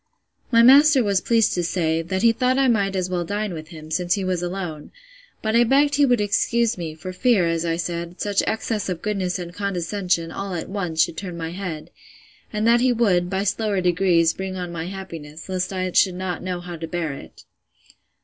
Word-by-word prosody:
My 230 -1 +5
master 275 +1 +7
was 200 -3 +1
pleased 230 -2 +2
to 175 - -1
say, 165 -2 0
that 190 +4 -3
he 230 - +6
thought 255 +3 +1
I 270 -1 +3
might 200 -5 +1
as 185 -1 0
well 180 -1 -2
dine 205 +2 -3
with 155 -1 -7
him, 155 -1 -11
since 175 +1 +1
he 200 - -3
was 180 -2 -1
alone: 175 -4 -5 0.5
But 220 0 0
I 235 - +6
begged 280 +4 +3
he 285 0 +4
would 245 -2 +3
excuse 230 +3 +1
me, 165 -4 -6
for 185 +3 -7
fear, 215 -2 +3
as 165 0 -1
I 165 -1 0
said, 170 +1 -4
such 205 -1 +1
excess 220 -2 -2
of 180 -2 -4
goodness 195 -4 -1
and 175 -1 -7
condescension, 180 -3 -2
all 195 0 -4
at 165 - -5
once, 175 -5 0
should 160 - -4
turn 180 -3 -6
my 165 -1 -4
head;—and 185 +4 -7
that 235 +1 +5
he 255 0 +3
would, 190 -7 +2
by 190 +1 -1
slower 205 0 0
degrees, 175 -2 +3
bring 190 0 -5
on 180 -1 -5
my 165 0 -5
happiness, 165 -5 -8
lest 185 -1 -2
I 185 -1 -2
should 185 0 +3
not 180 -2 -4
know 180 -1 -4
how 175 -1 -7
to 165 0 -6
bear 165 -3 -3
it. 135 - -12
185 Hz, 210 wpm, -22 LUFS, 170-210 Hz, 0.5 s, master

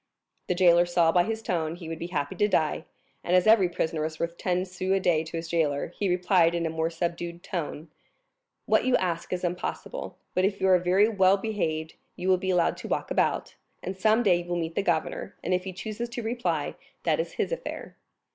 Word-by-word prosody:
The 180 - 0
jailer 175 -1 +5
saw 170 -2 +3
by 175 +1 +3
his 225 +1 -3
tone 165 -4 -1
he 175 -2 -9
would 165 0 -5
be 170 - -4
happy 145 -5 -2
to 210 - +3
die; 160 -4 0 0.4
and 175 - +2
as 180 - +4
every 215 -5 +6
prisoner 160 -2 -2
is 155 0 -4
worth 170 0 -2
ten 180 +1 -1
sous 185 0 -4
a 195 - +3
day 165 -4 +2
to 165 +1 -6
his 165 0 -5
jailer, 155 -4 0
he 195 +3 -2
replied 180 -1 +3
in 170 -1 -1
a 160 - -1
more 160 0 -1
subdued 170 0 -4
tone. 160 -2 -4 0.8
"What - - +3
you 255 -1 +4
ask 175 -5 -1
is 180 0 -2
impossible; 180 - -4 0.2
but 185 - +1
if 195 +1 +1
you 190 - +2
are 185 -1 +6
very 185 +4 +4
well 195 -3 +4
behaved 160 -7 -3 0.2
you 185 - -2
will 185 - +5
be 190 - -3
allowed 180 -2 +2
to - - -7
walk - - -2
about, - - 0 0.3
and 190 - -4
some 215 +5 +3
day 185 -5 +4
you 175 - -5
will 175 - 0
meet 165 -1 -3
the 200 - 0
governor, 170 -5 -1
and 185 - 0
if 180 0 0
he 190 - -4
chooses 215 +6 -5
to 240 0 -5
reply, 240 +2 -1 0.3
that - - +1
is 485 - -2
his - - -2
affair." - - -5
180 Hz, 225 wpm, -27 LUFS, 170-190 Hz, 0.8 s, every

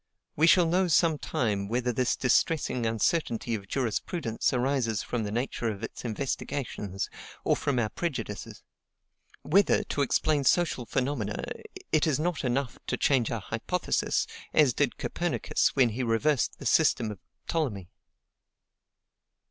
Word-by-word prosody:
We 160 +2 +4
shall 175 0 +6
know 180 +3 +2
some 160 -1 +3
time 100 -5 -1
whether 120 +2 0
this 125 +1 +1
distressing 130 -2 +1
uncertainty 115 - 0
of 100 -3 -4
jurisprudence 115 - -1
arises 125 -4 0
from 120 - -2
the 105 -1 -3
nature 120 0 -2
of 105 0 -6
its - - -6
investigations, 110 -4 -3 0.4
or - - +3
from 140 -3 -1
our 110 -3 +1
prejudices; 125 -12 -5 0.8
whether, 200 +5 +3
to 150 - -2
explain 145 +2 +2
social 135 -5 +2
phenomena, 135 +2 -2 0.5
it 155 +1 +3
is 150 -2 +1
not 170 0 -1
enough 130 0 -1
to - - -1
change 130 -5 +2
our 115 -3 -3
hypothesis, 115 - -1 0.3
as 145 -5 +5
did - - 0
Copernicus - - 0
when 130 -3 +5
he 115 +4 -3
reversed 125 +4 +1
the - - -10
system 110 -2 +3
of 100 - -9 0.3
Ptolemy. 120 - -2
125 Hz, 140 wpm, -28 LUFS, 115-150 Hz, 0.8 s, shall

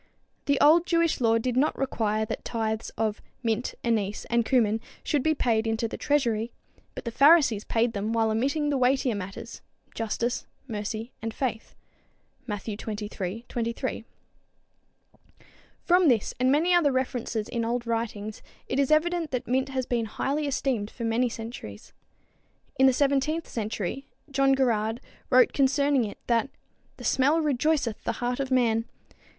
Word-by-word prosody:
The 280 -1 +2
old 330 +4 +6
Jewish 335 -4 +2
law 230 -1 +4
did 240 +2 -1
not 280 +4 +2
require 220 -5 0
that - - -5
tithes 220 -1 -2
of 215 -2 -1 0.2
"mint, 230 +2 -1
anise 215 -3 -1
and 235 0 +3
cumin" 225 -3 +2 0.2
should 295 - +1
be 315 +3 +2
paid 230 -4 +1
in 225 0 0
to 230 0 -1
the - - -6
treasury, 235 -6 0 0.4
but - - -7
the 235 - -2
Pharisees 275 -5 +5
paid 230 0 +1
them 205 +2 -2
while 225 -1 +2
omitting 280 +6 0
the 275 - +1
weightier 255 -1 +2
matters, 195 -1 -7 0.3
justice, 235 +2 -2 0.2
mercy, 220 +1 -4
and 225 0 -3
faith 240 -5 -3 0.7
(Matthew 210 0 -4
xxiii, 210 0 -5
23). 230 -1 -3 1.8
From 360 0 +4
this 235 -7 +2
and 255 +1 +3
many 330 +6 +3
other 335 -5 +4
references 245 -4 -2
in 235 -1 -2
old 235 +1 -1
writings 225 -2 -3 0.3
it 265 - -1
is 275 - +2
evident 330 +1 +2
that 250 -3 -3
mint 260 +2 +1
has 260 -1 -2
been 235 -2 -1
highly 285 +7 -2
esteemed 255 -6 -1
for 235 - -8
many 230 +2 +1
centuries. 225 - -8 0.9
In 265 - +7
the - - +6
seventeenth 285 +4 +1
century 220 +3 -4 0.2
John 275 0 +3
Gerarde 225 -3 +1 0.3
wrote 255 -1 +5
concerning 280 -1 +2
it 205 - -7
that 235 +1 +1 0.5
"the - - -10
smelle 285 +5 +3
rejoyceth 285 -4 0
the - - -1
heart 245 +1 -2
of 270 -1 -2
man." 230 -3 +2
240 Hz, 155 wpm, -27 LUFS, 225-275 Hz, 1.8 s, In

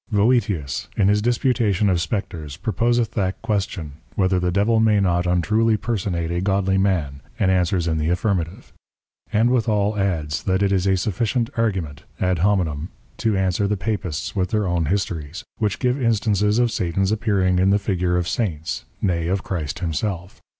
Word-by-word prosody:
Voetius 100 - +1
in 100 -1 +4
his 105 0 +3
Disputation 115 -4 +1
of 90 -3 +2
Spectres 85 - -4
proposeth 115 +3 0
that 95 -3 -1
Question, 95 -8 -2 0.2
whether 95 -1 +2
the 90 0 0
Devil 105 +5 +2
may 110 -2 +4
not 90 -2 +1
untruly 110 +6 +2
personate 90 -8 -2
a 85 0 -1
Godly 95 0 +1
Man, 80 -8 0 0.2
and 95 -2 +2
answers 90 -1 +1
in 80 -1 0
the 75 +1 0
Affirmative: 90 -1 -2 0.6
And 115 +2 +3
withal 110 -4 +1
adds, 80 -6 -1
that 95 +1 +1
it 100 - +2
is 95 0 +1
a 95 -1 +3
sufficient 115 +5 -1
Argument 90 -10 -2
(ad 90 -2 +1
hominem) 85 -4 +1 0.3
to 110 -3 +1
answer 95 +1 +1
the 105 0 0
Papists 95 -7 -3
with 90 -2 0
their 105 0 0
own 85 -3 0
Histories, 85 0 -2 0.2
which 105 -3 0
give 125 +1 0
Instances 105 -2 +2
of 120 -1 +2
Satan's 95 +2 0
appearing 100 -4 +1
in 95 +1 +3
the 100 - +4
Figure 90 -3 0
of 90 -1 -1
Saints, 85 - -2 0.2
nay 85 -4 0
of 95 +2 -1
Christ 80 -6 -3
himself. 90 +2 -3
95 Hz, 170 wpm, -22 LUFS, 90-105 Hz, 0.6 s, in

